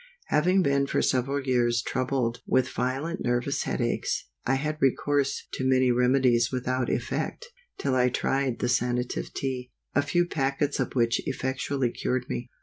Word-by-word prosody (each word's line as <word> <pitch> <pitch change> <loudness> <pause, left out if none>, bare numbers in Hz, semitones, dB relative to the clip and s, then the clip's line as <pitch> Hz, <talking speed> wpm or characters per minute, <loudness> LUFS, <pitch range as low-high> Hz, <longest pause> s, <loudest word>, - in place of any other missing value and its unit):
HAVING 180 +5 +3
been 140 -1 +2
for - - +1
several 135 +2 +1
years 120 -3 +2
troubled 125 -2 -1
with 130 0 +2
violent 140 +8 -2
nervous 120 0 0
head - - -2
aches, - - -1 0.2
I 135 - +3
had 155 +3 -2
recourse 140 +1 +1
to - - -3
many 130 -1 +4
remedies 125 -1 +3
without 130 0 -1
effect, 480 - -2 0.3
till 140 - -1
I 125 -1 +3
tried 135 0 0
the - - -1
Sanative 125 0 -1
Tea, 130 -2 -3 0.2
a 145 - +4
few 175 +5 +1
packets 140 -2 -1
of - - -1
which 115 -1 +2
effectually 130 -1 -1
cured 125 +1 -2
me. 120 - -4
130 Hz, 155 wpm, -27 LUFS, 125-140 Hz, 0.3 s, many